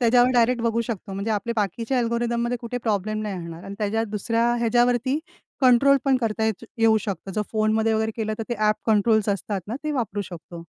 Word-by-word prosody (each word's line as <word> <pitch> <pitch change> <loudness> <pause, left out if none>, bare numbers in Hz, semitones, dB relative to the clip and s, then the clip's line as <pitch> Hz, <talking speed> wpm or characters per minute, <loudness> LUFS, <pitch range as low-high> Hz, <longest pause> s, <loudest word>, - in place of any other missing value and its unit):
त्याच्यावर 245 +1 +5
डायरेक्ट 240 0 +3
बघू 230 0 +1
शकतो 215 -4 -5
म्हणजे 200 +3 -3
आपले 210 +3 -1
बाकीचे 225 +4 -1
अल्गोरिथममध्ये 235 0 0
कुठे 245 +1 -4
प्रॉब्लेम 215 +1 0
नाही 205 -2 -3
येणार 170 +1 -9
आणि 195 - -7
त्याच्या 220 +1 0
दुसऱ्या 230 +3 0
ह्याच्यावरती 245 +3 +2 0.4
कंट्रोल 260 +2 +6
पण 270 -2 +4
करता 220 -1 -1
येत 220 0 -2
येऊ 225 -1 +5
शकतं. 195 -2 -5
जर 210 - 0
फोनमध्ये 220 0 +2
वगैरे 220 0 0
केलं 215 -1 -2
तर - - -2
ते 240 - -1
ऍप 215 - +3
कंट्रोलस 220 0 +3
असतात 200 0 -1
ना 230 - -3
ते 305 - -1
वापरू 220 -7 -2
शकतो. 170 -1 -10
225 Hz, 195 wpm, -24 LUFS, 210-235 Hz, 0.4 s, कंट्रोल